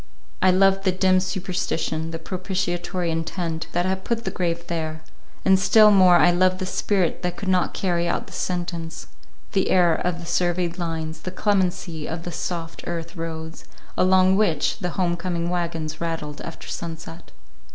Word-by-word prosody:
I 185 Hz, -, +5 dB
loved 195 Hz, +1 st, +4 dB
the 190 Hz, -, +3 dB
dim 185 Hz, 0 st, +3 dB
superstition, 180 Hz, -4 st, -2 dB
the 165 Hz, -, -4 dB
propitiatory 180 Hz, 0 st, -2 dB
intent, 165 Hz, 0 st, -3 dB
that 175 Hz, +1 st, +1 dB
had 190 Hz, 0 st, -1 dB
put 235 Hz, 0 st, -2 dB
the -, -, -1 dB
grave 170 Hz, -1 st, -2 dB
there; 160 Hz, -2 st, -4 dB, 0.4 s
and 190 Hz, 0 st, +5 dB
still 215 Hz, +2 st, +7 dB
more 185 Hz, -3 st, +7 dB
I 175 Hz, -, +6 dB
loved 185 Hz, +1 st, +3 dB
the 185 Hz, -, -3 dB
spirit 185 Hz, -1 st, 0 dB
that 180 Hz, -1 st, -2 dB
could 200 Hz, -, -5 dB
not 185 Hz, -1 st, +2 dB
carry 175 Hz, -2 st, 0 dB
out -, -, -1 dB
the -, -, -14 dB
sentence—the 175 Hz, +2 st, -4 dB
error 175 Hz, -3 st, +4 dB
from 180 Hz, -1 st, -1 dB
the 170 Hz, -, -8 dB
surveyed 175 Hz, 0 st, 0 dB
lines, 160 Hz, -2 st, -3 dB
the 185 Hz, -, -5 dB
clemency 180 Hz, -5 st, -1 dB
of 165 Hz, +1 st, -4 dB
the 175 Hz, -, -5 dB
soft 165 Hz, 0 st, -4 dB
earth 170 Hz, -1 st, -4 dB
roads 160 Hz, -1 st, -6 dB, 0.3 s
along 185 Hz, +1 st, +4 dB
which 170 Hz, -9 st, +1 dB
the 180 Hz, -, -2 dB
home 175 Hz, -2 st, +1 dB
coming 170 Hz, -1 st, -2 dB
wagons 165 Hz, -3 st, -3 dB
rattled 160 Hz, -3 st, -3 dB
after 165 Hz, -, -8 dB
sunset. 165 Hz, 0 st, -7 dB
175 Hz, 165 wpm, -23 LUFS, 165-185 Hz, 0.4 s, still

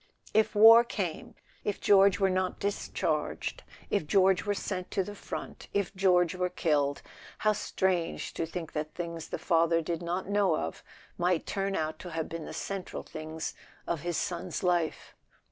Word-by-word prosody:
If 220 Hz, 0 st, +3 dB
war 225 Hz, +3 st, +9 dB
came, 195 Hz, -8 st, -4 dB, 0.3 s
if 205 Hz, -, -2 dB
George 195 Hz, -2 st, +5 dB
were 195 Hz, -1 st, +3 dB
not 185 Hz, 0 st, -1 dB
discharged, 200 Hz, 0 st, -2 dB, 0.3 s
if 185 Hz, -7 st, 0 dB
George 190 Hz, +1 st, +4 dB
were 205 Hz, -, +1 dB
sent 185 Hz, -2 st, -4 dB
to 195 Hz, -, 0 dB
the 205 Hz, -, -7 dB
front, 205 Hz, -, -7 dB
if 200 Hz, -1 st, 0 dB
George 180 Hz, -3 st, +3 dB
were 180 Hz, 0 st, -1 dB
killed, 145 Hz, -5 st, 0 dB, 0.3 s
how 215 Hz, 0 st, +2 dB
strange 185 Hz, -4 st, -1 dB
to 165 Hz, -, -2 dB
think 165 Hz, -1 st, -6 dB
that 150 Hz, 0 st, -4 dB
things 170 Hz, -2 st, -5 dB
the -, -, -4 dB
father 165 Hz, -1 st, +3 dB
did 165 Hz, +1 st, -3 dB
not 175 Hz, +2 st, -2 dB
know 200 Hz, -4 st, +3 dB
of 80 Hz, -, -4 dB, 0.4 s
might 175 Hz, -1 st, +1 dB
turn 195 Hz, 0 st, -1 dB
out 155 Hz, 0 st, -2 dB
to 180 Hz, -, -7 dB
have 160 Hz, -1 st, -3 dB
been 165 Hz, -1 st, -5 dB
the -, -, -7 dB
central 195 Hz, -2 st, -5 dB
things 155 Hz, +1 st, -6 dB, 0.3 s
of 170 Hz, -4 st, -2 dB
his 175 Hz, 0 st, -2 dB
son's 180 Hz, -3 st, -3 dB
life! 175 Hz, -3 st, 0 dB
180 Hz, 170 wpm, -30 LUFS, 165-195 Hz, 0.4 s, war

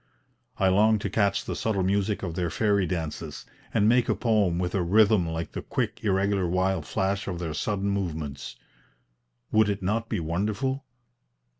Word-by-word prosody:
I 95 Hz, -, +3 dB
long 105 Hz, +4 st, +4 dB
to 100 Hz, -2 st, -4 dB
catch 100 Hz, -2 st, +1 dB
the -, -, -3 dB
subtle 105 Hz, -4 st, 0 dB
music 100 Hz, +2 st, 0 dB
of 85 Hz, -3 st, -3 dB
their 85 Hz, 0 st, -1 dB
fairy 100 Hz, +1 st, +1 dB
dances 80 Hz, -2 st, -4 dB, 0.3 s
and 105 Hz, -2 st, +3 dB
make 120 Hz, +1 st, +3 dB
a -, -, +3 dB
poem 105 Hz, -7 st, +2 dB
with 90 Hz, 0 st, -2 dB
a 95 Hz, -, +1 dB
rhythm 100 Hz, 0 st, +4 dB
like 80 Hz, 0 st, -4 dB
the -, -, -5 dB
quick -, -, -3 dB
irregular 100 Hz, -2 st, +1 dB
wild 90 Hz, -2 st, 0 dB
flash 100 Hz, +1 st, -1 dB
of 90 Hz, -3 st, -3 dB
their 85 Hz, -3 st, -4 dB
sudden 100 Hz, +4 st, -1 dB
movements. 80 Hz, -8 st, -4 dB, 1.0 s
Would 110 Hz, -1 st, +4 dB
it 100 Hz, -2 st, -2 dB
not 115 Hz, +4 st, -1 dB
be 110 Hz, -, -1 dB
wonderful? 105 Hz, -, -1 dB
95 Hz, 170 wpm, -26 LUFS, 85-105 Hz, 1.0 s, long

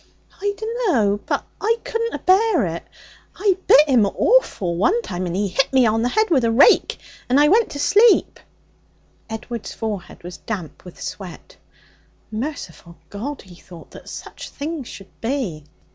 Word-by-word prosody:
'I 405 Hz, 0 st, -1 dB
dunno. 385 Hz, -, 0 dB
But -, -, -1 dB, 0.2 s
I 450 Hz, +3 st, +2 dB
couldn't 460 Hz, 0 st, -2 dB
abear 380 Hz, -, +3 dB
it. 170 Hz, 0 st, -5 dB, 0.5 s
I 395 Hz, -1 st, +2 dB
bit 300 Hz, +2 st, +7 dB
him 240 Hz, -7 st, +4 dB
awful 200 Hz, -, +1 dB
one 360 Hz, -, +2 dB
time, 180 Hz, 0 st, -4 dB
and 170 Hz, -, -3 dB
he 200 Hz, +1 st, 0 dB
hit 230 Hz, +9 st, 0 dB
me 260 Hz, -2 st, +4 dB
on 225 Hz, 0 st, +2 dB
the 245 Hz, -, +1 dB
head 435 Hz, -, +1 dB
with 270 Hz, -6 st, +3 dB
a 230 Hz, -, +2 dB
rake, 235 Hz, +5 st, +4 dB, 0.3 s
and 260 Hz, +3 st, +4 dB
I 295 Hz, 0 st, +5 dB
went 440 Hz, +4 st, +3 dB
to 285 Hz, -, -7 dB
sleep.' 410 Hz, +10 st, +4 dB, 0.9 s
Edward's 225 Hz, +1 st, -6 dB
forehead 210 Hz, -7 st, -6 dB
was 175 Hz, +1 st, -8 dB
damp 185 Hz, -8 st, -7 dB
with 180 Hz, -, -12 dB
sweat. 185 Hz, -4 st, -8 dB, 0.8 s
'Merciful 215 Hz, -, -6 dB
God!' 265 Hz, +8 st, -6 dB
he 185 Hz, -, -15 dB
thought, 175 Hz, -1 st, -14 dB
'that -, -, -12 dB
such -, -, -9 dB
things 290 Hz, -2 st, -5 dB
should 195 Hz, -1 st, -13 dB
be!' 225 Hz, -, -3 dB
245 Hz, 160 wpm, -21 LUFS, -, 0.9 s, bit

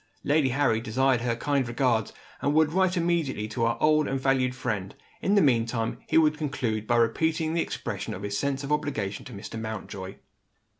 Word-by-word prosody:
Lady 145 Hz, -2 st, +3 dB
Harry 125 Hz, -4 st, +2 dB
desired 125 Hz, +2 st, +1 dB
her 120 Hz, -1 st, 0 dB
kind 135 Hz, +1 st, 0 dB
regards, 120 Hz, -3 st, +1 dB, 0.3 s
and 145 Hz, +1 st, +1 dB
would 155 Hz, 0 st, +3 dB
write 185 Hz, 0 st, +2 dB
immediately 165 Hz, -10 st, 0 dB
to 115 Hz, +1 st, -1 dB
her 115 Hz, 0 st, +1 dB
old 155 Hz, 0 st, +3 dB
and 135 Hz, -, -1 dB
valued 130 Hz, -1 st, +1 dB
friend. 105 Hz, -7 st, -3 dB, 0.3 s
In 200 Hz, -, +2 dB
the 200 Hz, -, +5 dB
meantime, 115 Hz, -3 st, +1 dB
he -, -, +2 dB
would 155 Hz, -1 st, +4 dB
conclude 120 Hz, -8 st, -2 dB
by 120 Hz, -, +2 dB
repeating 160 Hz, +7 st, +1 dB
the 170 Hz, -, +1 dB
expression 105 Hz, -9 st, -4 dB
of 95 Hz, -, -8 dB
his 100 Hz, 0 st, -3 dB
sense 140 Hz, +4 st, -1 dB
of 140 Hz, -, -5 dB
obligation 135 Hz, -10 st, -2 dB
to -, -, -9 dB
Mr. 105 Hz, +2 st, -7 dB
Mountjoy. 100 Hz, -3 st, -6 dB
130 Hz, 190 wpm, -27 LUFS, 110-150 Hz, 0.3 s, the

